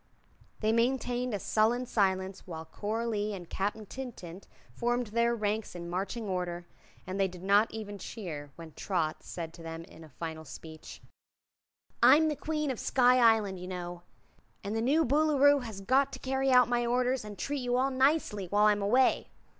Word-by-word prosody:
They 215 0 +2
maintained 245 +1 0
a 205 - -1
sullen 225 +5 +1
silence 190 -4 -1
while 160 -2 -7
Coralie 210 +3 -2
and 175 -3 -9
Captain 205 +4 -3
Tintint 200 -7 -8 0.3
formed 240 - 0
their 235 0 +2
ranks 215 -2 -2
in 170 0 -6
marching 200 +5 -3
order, 180 -2 -3 0.4
and 185 +2 -4
they 195 - +3
did 180 -1 -11
not 200 +3 +4
even 205 -2 -7
cheer 165 -9 -7
when 165 -1 -10
Trot 160 -3 -2
said 165 -2 -7
to 170 - -12
them 165 0 -7
in 165 -1 -14
a 160 - -13
final 160 +2 -6
speech: 160 +1 -11 1.0
"I'm 315 +1 +7
the 300 - -1
Queen 305 -1 -2
of 250 - -5
Sky 255 -1 +4
Island, 220 -5 +3
you 180 - -7
know, 175 -1 -6 0.6
and 205 +2 -3
the 225 - 0
new 295 +7 +3
Boolooroo 285 +1 +4
has 220 -5 -7
got 265 +7 +2
to - - -5
carry 265 +1 -1
out 250 -2 +6
my 240 0 +1
orders 250 +1 +1
and 210 -1 -9
treat 285 +7 -3
you 245 0 0
all 265 +2 +1
nicely 260 - +1
while 205 +3 +3
I'm 210 -1 +3
away. 250 +6 +3
215 Hz, 180 wpm, -30 LUFS, 185-250 Hz, 1.0 s, I'm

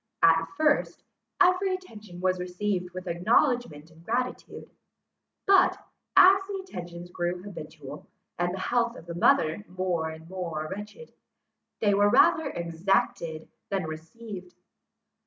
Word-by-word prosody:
At 165 0 +5
first, 305 -2 +1 0.4
every 370 +1 +4
attention 215 - -11
was 185 0 +1
received 180 0 -2
with 185 +1 -8
acknowledgments 175 - +1
and 165 +1 -18
gratitude; 250 +6 -3 0.7
but, 390 -1 +5 0.4
as 385 +1 +8
the 400 -1 -4
attentions 175 - -8
grew 175 +1 -3
habitual, 155 -6 -9 0.3
and 175 0 +1
the 190 - -5
health 240 0 +1
of - - -11
the 170 - -6
mother 170 +2 +3
more 180 -3 -2
and 160 0 -10
more 170 -4 -4
wretched, 210 - -8 0.7
they 205 -2 +3
were 205 +1 +4
rather 300 +7 +4
exacted, 170 -2 -1 0.2
than 195 -1 -1
received. 180 +4 -9
185 Hz, 125 wpm, -27 LUFS, 170-230 Hz, 0.7 s, as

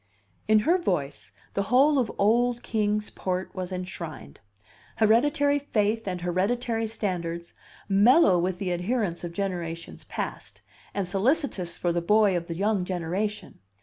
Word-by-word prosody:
In 215 0 +5
her 350 +4 +4
voice, 140 - -2 0.2
the 200 - 0
whole 275 +4 +5
of 240 -4 0
old 240 +3 +2
Kings 210 -1 -1
Port 185 0 -3
was 185 -1 -5
enshrined: 175 - -7 0.6
hereditary 285 +6 +3
faith 225 -5 0
and 180 -2 -3
hereditary 225 +6 0
standards, 170 -6 -4 0.3
mellow 200 - +5
with 180 +1 -1
the 190 -2 -2
adherence 180 0 -1
of 170 - -4
generations 170 -3 -4
past, - - -6 0.3
and 200 -2 -1
solicitous 200 - 0
for 175 - 0
the 175 - 0
boy 210 +2 +4
of 170 -1 -2
the 165 - -4
young 200 +1 +1
generation. 185 +4 -3
200 Hz, 140 wpm, -26 LUFS, 175-225 Hz, 0.6 s, In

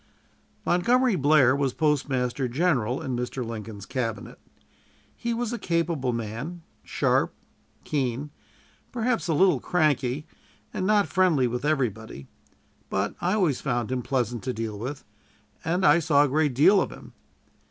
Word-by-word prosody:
Montgomery 240 +6 +3
Blair 140 -4 +4
was 140 -2 0
Postmaster 135 -4 0
General 130 -4 0
in 130 - -2
Mr. 125 +1 -3
Lincoln's 110 -3 -7
Cabinet. 115 -5 -4 0.8
He 235 - -3
was 235 0 -2
a 235 - -3
capable 165 -6 0
man, 120 +10 -5 0.2
sharp, - - 0 0.5
keen, 135 0 -2 0.6
perhaps 235 -3 -1
a 160 - +1
little 180 -4 +4
cranky, 150 -3 0 0.5
and 185 - -2
not 210 -1 +4
friendly 175 -8 +3
with 120 +1 -2
everybody; 110 - -2 0.6
but 95 +1 -1
I 180 +2 +1
always 175 -11 +1
found 120 -3 -1
him 130 -1 -1
pleasant 120 -3 -1
to 130 - -1
deal 110 -2 -4
with, 135 +6 -5 0.6
and 175 +4 0
I 170 - +6
saw 145 -3 +4
a - - +2
great 145 -1 +1
deal 190 +9 +6
of - - -2
him. - - -12
140 Hz, 140 wpm, -26 LUFS, 120-175 Hz, 0.8 s, I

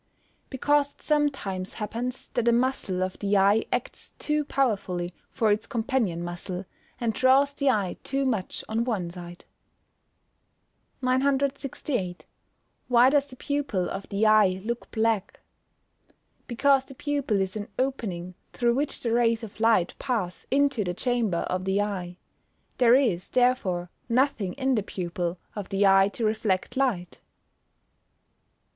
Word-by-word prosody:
_ - - -40
Because 285 +1 +1
it - - -23
sometimes 275 -12 -1
happens 235 +4 -4
that 240 -1 -1
a - - +6
muscle 235 -7 0
of 185 0 -4
the 200 0 +2
eye 200 +3 +4
acts - - -4
too 300 0 0
powerfully 195 -11 -1 0.2
for 220 -2 +1
its 210 +1 0
companion 225 -8 -1
muscle, 180 +2 -5 0.3
and 230 -2 0
draws 270 +3 +4
the 280 -1 +1
eye 200 -8 0
too 275 0 -1
much 220 -8 -2
on 225 +1 0
one 200 -8 -2
side. 175 0 -10 1.6
968. 265 -6 0 0.6
Why 250 +1 +6
does 285 -1 +3
the 255 - -12
pupil 270 -10 -1
of 195 - -6
the 205 +1 +1
eye 210 -4 +5
look 235 +1 -4
black? 220 -3 0 1.1
Because 270 +2 +3
the 270 - -12
pupil 280 -8 -1
is 190 0 -2
an 205 -1 -4
opening 200 -10 -2 0.2
through 240 -1 +2
which 280 +3 -2
the 230 - -1
rays 230 -1 +2
of 215 -1 -9
light 225 -6 +3
pass 220 -10 -3
into 275 -4 +2
the 180 -2 -3
chamber 235 -7 0
of 185 0 -2
the 190 +1 +1
eye. 185 -4 -3 0.6
There 245 -1 +6
is, 220 -10 +1
therefore, 215 -9 +1 0.2
nothing 230 -6 +1
in 265 -1 0
the 220 - +2
pupil, 175 -2 -3 0.2
of 205 -3 -5
the 200 0 +2
eye 195 0 +6
to 230 - -2
reflect 215 -3 0
light. 235 -10 -1
225 Hz, 145 wpm, -26 LUFS, 190-260 Hz, 1.6 s, a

